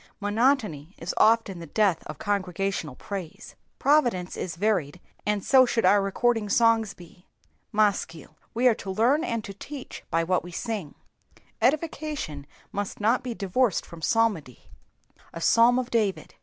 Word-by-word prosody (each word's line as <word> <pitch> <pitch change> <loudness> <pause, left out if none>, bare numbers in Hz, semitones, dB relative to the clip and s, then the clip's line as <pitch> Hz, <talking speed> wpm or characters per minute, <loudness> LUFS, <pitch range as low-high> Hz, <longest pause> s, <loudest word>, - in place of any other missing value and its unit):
Monotony 205 - 0
is 165 +2 -4
often 220 -5 +3
the 165 - -8
death 195 -1 +1
of - - -7
congregaiional 195 -7 -2
praise. 190 -6 -7 0.2
Providence 240 -11 +2
is 165 -3 -5
xxiried, 180 -6 0 0.3
and 210 -2 0
so 265 -1 +6
should 235 -2 +1
our 205 0 +5
recording 215 +2 0
songs 225 -1 +3
be. 180 +1 -16 0.4
Maschil. 205 -7 0 0.2
We 245 +2 +3
are 245 - +6
to 200 - -8
learn 240 - +2
and 230 -9 -2
to 200 - -8
teach 270 +7 -9
by 165 +1 +1
whai 180 +2 +1
toe 175 - -10
sing. 190 -3 -5 0.7
Edification 285 - -1 0.2
must 205 -1 -4
not 225 +4 +2
be 245 -2 -5
divorced 205 +2 0
from 170 -1 -12
psalmody. 190 - 0 0.6
A - - -6
Psalm 230 +8 +5
of 255 -1 -2
David. 200 -8 -1
205 Hz, 150 wpm, -26 LUFS, 180-235 Hz, 0.7 s, so